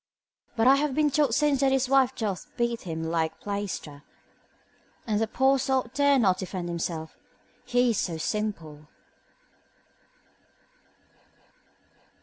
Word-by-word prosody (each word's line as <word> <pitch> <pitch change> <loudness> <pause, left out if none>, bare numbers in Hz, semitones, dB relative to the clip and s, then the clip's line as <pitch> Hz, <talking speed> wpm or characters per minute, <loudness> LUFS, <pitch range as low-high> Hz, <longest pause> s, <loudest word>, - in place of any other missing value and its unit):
But 225 -1 +1
I 270 +2 +6
have 285 -2 -1
been 300 -1 +2
told 275 -4 +2
since 295 -3 +2
that 270 -1 +3
his 265 -1 +1
wife 265 -1 +3
doth 205 -5 -4
beat 235 -1 -1
him 160 0 -4
like 160 -1 -2
plaister, 200 -8 -5 1.0
and 215 -1 0
the 225 - +1
poor 265 +4 +2
sot 260 -2 -1
dare 285 0 +3
not 190 -7 +2
defend 185 -2 -5
himself, 165 -2 -4 0.5
he 245 -1 +2
is 220 - -1
so 170 -3 -2
simple. 160 -6 -4
225 Hz, 130 wpm, -26 LUFS, 175-265 Hz, 1.0 s, I